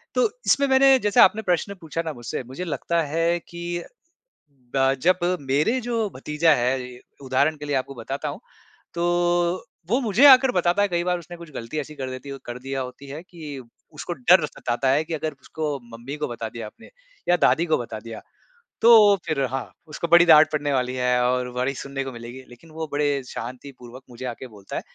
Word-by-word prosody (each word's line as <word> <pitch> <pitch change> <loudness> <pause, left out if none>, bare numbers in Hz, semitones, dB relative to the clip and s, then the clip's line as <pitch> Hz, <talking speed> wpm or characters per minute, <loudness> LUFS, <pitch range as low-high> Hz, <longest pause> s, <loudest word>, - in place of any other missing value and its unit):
तो 470 - +3 0.2
इसमें 280 0 +3
मैंने 265 0 +6
जैसे 205 -3 +1
आपने 215 +3 +5
प्रश्न 180 +3 0
पूछा 165 0 -3
ना 160 - -3
मुझसे 120 0 -5
मुझे 130 +8 -7
लगता 170 0 -1
है 165 +3 0
कि 175 0 -5 0.9
ब 135 0 +3
जब 185 +1 +4 0.2
मेरे 145 - +1
जो 230 -3 -1
भतीजा 150 +4 +2
है, 125 0 -2 0.2
उदाहरण 140 +4 +1
के 145 - -9
लिए 145 -2 0
आपको 135 +1 -3
बताता 130 +4 -5
हूँ। - - -7 0.5
तो 170 - -2 0.9
वो 240 +5 +2
मुझे 235 +4 +4
आकर 265 -1 +7
बताता 180 +1 +1
है 205 - +3
कई 175 -2 -1
बार 180 0 0
उसने 175 +1 -11
कुछ 170 -2 -12
गलती 115 +4 -6
ऐसी 150 +1 -7
कर 130 -2 -5
देती 130 +2 -8
कर 120 +1 -6
दिया 135 +1 -4
होती 130 +2 -8
है 145 +3 -7
कि 155 -7 -9 0.3
उसको 150 +3 -5
डर 170 +4 +4
सताता 130 -2 -2
है 140 +4 +3
कि 165 - -5
अगर 155 0 -2
उसको 150 -3 -4 0.2
मम्मी 125 +5 -7
को 150 - -2
बता 115 -2 -5
दिया 115 0 -7
आपने - - -15 0.4
या 175 - +6
दादी 170 - +3
को 160 - +2
बता 115 -2 -6
दिया। 115 0 -9 0.6
तो 235 - +7 0.3
फ़िर 145 -4 -1
हाँ, 130 +1 -4 0.2
उसको 155 +2 -4
बड़ी 175 +1 +7
डाँट 155 -1 +7
पड़ने 145 -1 -1
वाली 125 -1 0
है 125 -1 +1
और 125 0 0
बड़ी 125 +2 -1
सुनने 135 +2 -5
को 135 - -6
मिलेगी। 120 +2 -9
लेकिन 125 +7 -16
वो 160 0 -5
बड़े 145 -1 0
शांतिपूर्वक 125 +1 -9
मुझे 125 +1 -8
आके 125 +1 -6
बोलता 105 -4 -10
है - - -2
145 Hz, 200 wpm, -23 LUFS, 130-170 Hz, 0.9 s, आकर